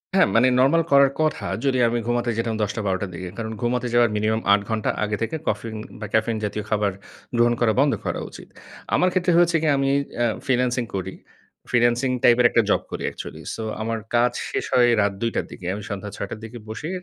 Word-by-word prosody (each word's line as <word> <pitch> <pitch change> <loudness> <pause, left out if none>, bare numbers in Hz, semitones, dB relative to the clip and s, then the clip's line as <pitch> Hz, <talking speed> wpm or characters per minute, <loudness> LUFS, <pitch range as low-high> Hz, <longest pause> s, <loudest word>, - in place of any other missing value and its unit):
হ্যাঁ, 195 - +5
মানে 120 +3 +5
নরমাল 145 +6 +4
করার 140 -1 +6
কথা। 155 0 0 0.2
যদি 135 -2 +2
আমি 120 +1 0
ঘুমাতে 120 0 0
যেতাম 115 -1 -1
১০ 105 -1 0
টা, 110 - -2
১২ 95 -1 +1
টার 100 - -3
দিকে। 90 +1 -6
কারণ 110 -1 -4
ঘুমাতে 125 +1 0
যাওয়ার 120 -1 +5
মিনিমাম 110 +1 0
৮ 100 - +3
ঘন্টা 110 -1 -1
আগে 105 0 -1
থেকে 115 +7 -2
কফিন 110 +1 -2 0.2
বা, 105 - -5
ক্যাফেইন 110 +1 +1
জাতীয় 105 +1 -3
খাবার 105 -2 +1 0.5
গ্রহণ 120 0 +4
করা 115 -2 +3
বন্ধ 140 0 +4
করা - - -2
উচিত। - - -12 0.5
আমার 180 - +3
ক্ষেত্রে 180 -1 +2
হয়েছে 175 -1 +4
কি? 160 - 0
আমি 135 0 +1 0.3
এ - - +3 0.2
ফ্রিল্যান্সিং 125 -1 +1
করি। 95 - -4 0.6
ফ্রিল্যান্সিং 120 +1 +2
টাইপের 120 0 +5
একটা 120 - +3
জব - - +3
করি - - -5
একচুয়ালি। - - -8
সো 110 - -5 0.2
আমার 115 +1 -2 0.2
কাজ 120 +1 +4 0.2
শেষ - - -2
হয় 120 -1 +5
রাত 100 -1 +1
২ 115 - +1
টার - - 0
দিকে। 90 - -10
আমি 105 +1 -6
সন্ধ্যা 100 0 -5
৬ 100 - -4
টার 110 - -6
দিকে 115 +2 -8
বসে 115 +9 -5
120 Hz, 215 wpm, -23 LUFS, 110-125 Hz, 0.6 s, করার